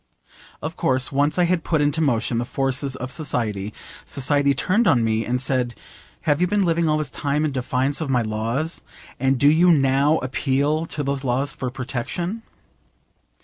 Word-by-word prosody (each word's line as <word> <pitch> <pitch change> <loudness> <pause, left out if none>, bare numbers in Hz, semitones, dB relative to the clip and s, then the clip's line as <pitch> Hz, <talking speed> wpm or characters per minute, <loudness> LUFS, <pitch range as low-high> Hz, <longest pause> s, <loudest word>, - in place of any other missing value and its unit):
Of - - -4
course 130 0 +1
once 145 +3 +1
I 180 - +4
had 175 -1 +1
put 160 - 0
into 145 +2 +1
motion 120 -5 +1
the - - 0
forces 135 +1 -1
of 130 0 -6
society, 110 -8 -2 0.3
society 140 +1 +1
turned 205 - +2
on 120 -9 +4
me 110 0 +1
and 125 +2 -1
said, 125 -2 0 0.5
'Have 145 +1 +1
you 180 - +3
been 200 +1 +1
living 165 -1 +1
all 155 - +2
this 150 -3 -3
time 145 +1 -1
in 150 - -1
defiance 130 +2 -1
of 155 - -3
my 125 -3 +2
laws, 115 +9 -2 0.4
and 135 +1 +2
do 145 - +4
you 165 +4 +5
now 140 0 +3
appeal 140 +5 0
to 150 - -4
those 140 0 -2
laws 135 +2 0
for 130 - -4
protection? 135 - -4
140 Hz, 180 wpm, -22 LUFS, 125-155 Hz, 0.5 s, you